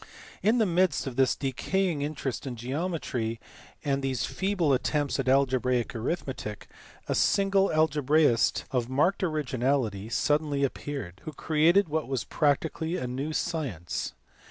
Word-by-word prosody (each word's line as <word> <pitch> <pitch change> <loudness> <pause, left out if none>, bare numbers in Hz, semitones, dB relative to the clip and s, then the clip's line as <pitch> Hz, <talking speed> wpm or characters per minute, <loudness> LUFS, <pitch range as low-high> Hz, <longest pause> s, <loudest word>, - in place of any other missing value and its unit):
In 220 +4 +3
the 225 - +4
midst 180 -3 +2
of 130 -3 -5
this 135 -1 +3
decaying 160 +5 -1
interest 145 -3 -3
in 125 - -4
geometry 125 -3 -3 0.5
and 140 -1 +1
these 135 -2 -1
feeble 190 -7 0
attempts 145 +2 0
at 130 -1 0
algebraic 130 -2 +2
arithmetic, 115 - -4 0.4
a - - 0
single 195 0 +3
algebraist 150 -4 +3
of 125 -3 0
marked 150 +10 +2
originality 130 - 0
suddenly 145 +2 +1
appeared 135 -9 -4
who 155 - -5
created 165 +7 +3
what 155 +1 -2
was 135 -2 -1
practically 160 +3 0
a 125 - -3
new 135 +5 -3
science. 145 - -3
140 Hz, 130 wpm, -28 LUFS, 130-160 Hz, 0.5 s, the